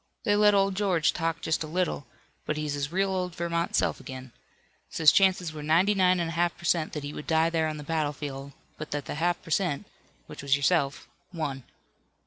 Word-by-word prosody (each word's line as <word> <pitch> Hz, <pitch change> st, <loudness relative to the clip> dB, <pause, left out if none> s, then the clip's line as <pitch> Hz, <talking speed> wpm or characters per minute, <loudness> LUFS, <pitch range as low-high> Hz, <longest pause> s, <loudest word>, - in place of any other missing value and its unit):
They 205 Hz, -, +2 dB
let 210 Hz, 0 st, +5 dB
old 195 Hz, 0 st, +3 dB
George 185 Hz, -5 st, +1 dB
talk 165 Hz, -1 st, -2 dB
just 160 Hz, -, -1 dB
a -, -, -6 dB
little, 165 Hz, -5 st, -2 dB, 0.4 s
but 150 Hz, -, -1 dB
he's 150 Hz, -1 st, -2 dB
his 145 Hz, +1 st, -3 dB
real 195 Hz, +2 st, +1 dB
old 180 Hz, -2 st, -2 dB
Vermont 170 Hz, -1 st, -1 dB
self -, -, +1 dB
again. 130 Hz, -1 st, -9 dB, 0.6 s
Says 160 Hz, -2 st, +5 dB
chances 185 Hz, -4 st, +3 dB
were 155 Hz, -, -7 dB
ninety 170 Hz, +7 st, +3 dB
nine 185 Hz, -2 st, +3 dB
and 170 Hz, -1 st, -1 dB
a -, -, -5 dB
half 175 Hz, +1 st, 0 dB
per -, -, -16 dB
cent 160 Hz, -2 st, +1 dB
that 150 Hz, -, -4 dB
he 145 Hz, +1 st, -5 dB
would 150 Hz, -, -8 dB
die 160 Hz, +1 st, +3 dB
there 160 Hz, -1 st, +1 dB
on 155 Hz, -1 st, -4 dB
the 150 Hz, -, -7 dB
battlefield, 145 Hz, -3 st, -3 dB, 0.3 s
but 155 Hz, -, -6 dB
that 145 Hz, -1 st, -3 dB
the -, -, -5 dB
half 175 Hz, +3 st, 0 dB
per 165 Hz, -, -11 dB
cent, 170 Hz, -5 st, 0 dB, 0.4 s
which -, -, -10 dB
was 140 Hz, 0 st, +2 dB
yourself, 140 Hz, -1 st, +1 dB, 0.2 s
won. 140 Hz, -7 st, -4 dB
165 Hz, 215 wpm, -27 LUFS, 150-180 Hz, 0.6 s, let